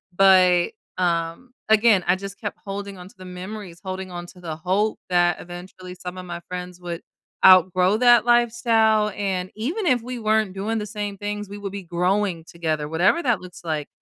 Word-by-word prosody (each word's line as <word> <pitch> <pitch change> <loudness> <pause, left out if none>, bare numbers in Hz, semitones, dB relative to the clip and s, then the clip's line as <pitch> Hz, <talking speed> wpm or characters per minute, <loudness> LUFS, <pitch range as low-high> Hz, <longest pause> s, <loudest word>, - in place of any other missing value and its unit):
But, 185 -2 +5 0.3
um, 175 +7 -1 0.2
again, 220 -3 +5
I 180 - +4
just 195 +1 -8
kept 210 - -5
holding 200 0 -6
on 180 - -10
to - - -21
the 185 - -11
memories, 180 -1 -8
holding 185 0 -5
on 175 0 -6
to 180 - -15
the 160 -3 -5
hope 195 +6 0
that 175 -1 +2
eventually 180 +1 -10
some 180 0 -8
of 180 - -8
my 170 0 -6
friends 180 0 -6
would, 170 -1 -5 0.4
outgrow 185 +1 +6
that 240 -1 +5
lifestyle, 230 -3 +3
and 190 -2 -2
even 320 - -3
if 250 -4 +3
we 250 0 -5
weren't 215 -3 +1
doing 215 +4 -2
the 210 - -4
same 205 -2 -5
things, 205 0 -5
we 205 - -7
will 200 -1 -5
be 200 -1 -6
growing 180 0 0
together, 155 -3 -3
whatever 180 - +2
that 240 -8 +1
looks 180 -1 -11
like. 155 -3 -3
190 Hz, 190 wpm, -23 LUFS, 180-215 Hz, 0.4 s, outgrow